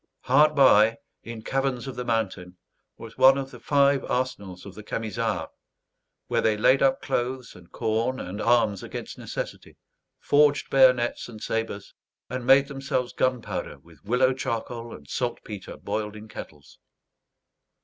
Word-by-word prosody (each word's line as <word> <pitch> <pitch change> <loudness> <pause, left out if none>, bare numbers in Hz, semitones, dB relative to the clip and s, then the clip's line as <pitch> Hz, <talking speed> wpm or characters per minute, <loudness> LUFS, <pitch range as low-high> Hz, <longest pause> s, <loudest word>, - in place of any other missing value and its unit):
Hard 150 +4 +4
by, 115 -5 +6 0.2
in 115 -1 -8
caverns 135 -2 -1
of 135 -3 -6
the 125 - -4
mountain, 100 -6 -2 0.4
was 115 +2 -11
one 135 +1 +7
of 135 -1 -4
the 125 - -11
five 140 +2 +3
arsenals 100 -8 -3
of 100 - -9
the 105 - -10
Camisards; 110 -5 -3 0.7
where - - 0
they 110 -1 +2
laid 130 +5 +4
up 135 -1 +2
clothes 125 0 -2
and 90 -1 -16
corn 115 +3 -1
and 95 +4 -6
arms 115 -4 +2
against - - -7
necessity, - - -7 0.4
forged 145 0 +2
bayonets 125 -3 +3
and 110 -2 -10
sabres, 110 -3 -4 0.4
and 125 -1 -4
made 135 +1 +6
themselves 135 -3 -3
gunpowder 130 -2 -2
with 80 -4 -21
willow 125 +4 +2
charcoal 115 -2 -4
and 70 - -15
saltpetre 100 +6 -5
boiled 105 -1 -4
in 110 +1 -10
kettles. 75 -9 -11
120 Hz, 145 wpm, -25 LUFS, 105-130 Hz, 0.7 s, one